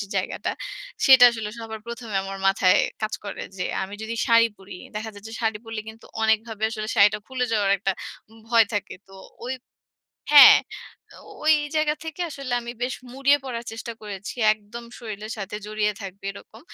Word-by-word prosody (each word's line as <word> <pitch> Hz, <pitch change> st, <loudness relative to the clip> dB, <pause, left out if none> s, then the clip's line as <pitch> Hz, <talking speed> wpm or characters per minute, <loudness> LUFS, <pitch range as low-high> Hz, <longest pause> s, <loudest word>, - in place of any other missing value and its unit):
যে 200 Hz, -, -4 dB
জায়গাটা -, -, -2 dB, 0.6 s
সেটা 260 Hz, -2 st, +9 dB
আসলে 225 Hz, -3 st, -5 dB
সবার 220 Hz, -1 st, -7 dB
প্রথমে 235 Hz, -3 st, -7 dB
আমার 195 Hz, 0 st, -6 dB
মাথায় 195 Hz, -2 st, +4 dB, 0.2 s
কাজ 215 Hz, 0 st, -1 dB
করে 205 Hz, -, -6 dB, 0.2 s
যে 180 Hz, -, -1 dB, 0.2 s
আমি 190 Hz, +2 st, -6 dB
যদি 225 Hz, +1 st, -4 dB
শাড়ি 230 Hz, 0 st, +6 dB
পড়ি 195 Hz, 0 st, -11 dB, 0.2 s
দেখা 220 Hz, +1 st, -4 dB
যাচ্ছে, 215 Hz, +2 st, -10 dB
শাড়ি 220 Hz, -2 st, 0 dB
পরলে 225 Hz, -1 st, -5 dB
কিন্তু 220 Hz, +1 st, -12 dB, 0.2 s
অনেকভাবে 220 Hz, 0 st, 0 dB
আসলে 215 Hz, -1 st, -4 dB
শাড়িটা 200 Hz, +1 st, +5 dB
খুলে 260 Hz, -1 st, -2 dB
যাওয়ার 205 Hz, -3 st, +2 dB
একটা 195 Hz, 0 st, 0 dB, 0.6 s
ভয় 230 Hz, -1 st, +6 dB
থাকে। 205 Hz, -, -3 dB
তো -, -, -17 dB, 0.3 s
ওই 260 Hz, -, -2 dB, 0.8 s
হ্যাঁ, 290 Hz, -1 st, +11 dB, 0.9 s
ওই 310 Hz, 0 st, +6 dB, 0.2 s
জায়গা 305 Hz, -1 st, +2 dB
থেকে 320 Hz, +2 st, -7 dB
আসলে 275 Hz, -3 st, -6 dB
আমি 235 Hz, 0 st, -7 dB
বেশ 250 Hz, +1 st, -1 dB, 0.2 s
মুড়িয়ে 275 Hz, +2 st, +3 dB
পড়ার 235 Hz, -3 st, -5 dB
চেষ্টা 225 Hz, +1 st, -6 dB
করেছি। 200 Hz, -2 st, -6 dB, 0.2 s
একদম 215 Hz, +3 st, -9 dB
শরীলের 215 Hz, -1 st, -6 dB
সাথে 205 Hz, +1 st, -5 dB
জড়িয়ে 210 Hz, 0 st, 0 dB
থাকবে 195 Hz, 0 st, -9 dB
এরকম। 215 Hz, +2 st, -14 dB
220 Hz, 170 wpm, -24 LUFS, 205-235 Hz, 0.9 s, হ্যাঁ